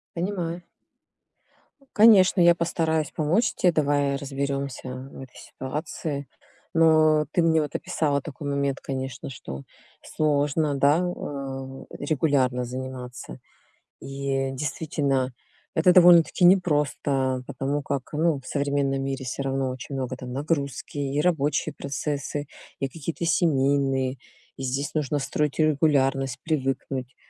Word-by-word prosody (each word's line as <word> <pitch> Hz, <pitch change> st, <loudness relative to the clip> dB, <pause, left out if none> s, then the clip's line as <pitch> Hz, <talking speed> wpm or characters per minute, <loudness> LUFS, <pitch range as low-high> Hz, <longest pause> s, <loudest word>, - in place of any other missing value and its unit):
Понимаю. 175 Hz, -1 st, -3 dB, 1.3 s
Конечно, 205 Hz, -4 st, +6 dB
я 170 Hz, 0 st, +6 dB
постараюсь 160 Hz, -2 st, 0 dB
помочь 165 Hz, +9 st, +1 dB
те. 180 Hz, -, +3 dB
Давай 145 Hz, -2 st, +1 dB
разберёмся, 140 Hz, -1 st, -3 dB
м, 130 Hz, +1 st, -7 dB
в -, -, -11 dB
этой 130 Hz, -1 st, -12 dB
ситуации. 145 Hz, +1 st, -5 dB, 0.5 s
Но 155 Hz, -2 st, +5 dB
ты 175 Hz, -, +3 dB
мне 160 Hz, -1 st, +3 dB
вот 150 Hz, -, -5 dB
описала 145 Hz, -3 st, 0 dB
такой 145 Hz, -1 st, -7 dB
момент, 140 Hz, -1 st, -1 dB
конечно, 130 Hz, -1 st, -5 dB
что 70 Hz, -, -8 dB, 0.4 s
сложно, 150 Hz, 0 st, 0 dB
да, 140 Hz, +4 st, +4 dB
э, 135 Hz, -6 st, -5 dB
регулярно 140 Hz, -4 st, +1 dB
заниматься. 125 Hz, -, -7 dB, 0.6 s
И 135 Hz, -1 st, -2 dB
действительно 135 Hz, -2 st, -1 dB, 0.4 s
это 175 Hz, +3 st, +4 dB
довольно-таки 175 Hz, 0 st, +6 dB
непросто, 145 Hz, -7 st, +2 dB
потому 140 Hz, +2 st, -2 dB
как, 135 Hz, -2 st, -4 dB
ну, 155 Hz, -2 st, +1 dB
в -, -, -20 dB
современном 140 Hz, -1 st, 0 dB
мире 135 Hz, -1 st, -3 dB
всё 130 Hz, +2 st, -4 dB
равно 135 Hz, -1 st, -1 dB
очень 130 Hz, +2 st, -6 dB
много 130 Hz, -1 st, -3 dB
там 125 Hz, -1 st, -7 dB
нагрузки 140 Hz, -1 st, -3 dB
и 140 Hz, +1 st, 0 dB
рабочие 150 Hz, -4 st, +1 dB
процессы, 145 Hz, 0 st, -4 dB, 0.3 s
и 135 Hz, -, -1 dB
какие-то 165 Hz, +3 st, -5 dB
семейные, 135 Hz, -5 st, +2 dB, 0.4 s
и 135 Hz, -, -6 dB
здесь 135 Hz, +3 st, -2 dB
нужно 150 Hz, -1 st, 0 dB
строить 150 Hz, +1 st, -1 dB
регулярность, 135 Hz, -4 st, +2 dB
привыкнуть, 135 Hz, -3 st, -2 dB
140 Hz, 120 wpm, -25 LUFS, 135-155 Hz, 1.3 s, Конечно